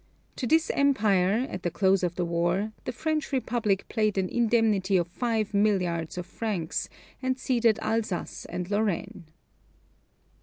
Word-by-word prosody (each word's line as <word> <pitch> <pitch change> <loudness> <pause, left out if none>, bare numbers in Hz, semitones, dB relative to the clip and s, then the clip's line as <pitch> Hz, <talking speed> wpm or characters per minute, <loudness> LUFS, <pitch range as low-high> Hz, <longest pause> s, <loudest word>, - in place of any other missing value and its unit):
To 250 - -2
this 320 +3 +3
Empire, 215 -5 +2
at 185 - -6
the 175 - -1
close 190 +2 +2
of 175 -1 -1
the 180 - -1
war, 175 +5 0
the - - -2
French 310 +4 -2
Republic 230 -7 0
paid 215 -3 0
an 185 -1 0
indemnity 220 -5 +2
of 175 -1 0
five 220 +2 -1
milliards 180 -6 +1
of 180 - -3
francs, 190 -4 -3 0.3
and 260 0 0
ceded 235 -4 +2
Alsace 220 -5 -2
and 175 0 -4
Lorraine. 205 -5 -1
205 Hz, 145 wpm, -27 LUFS, 180-235 Hz, 0.3 s, this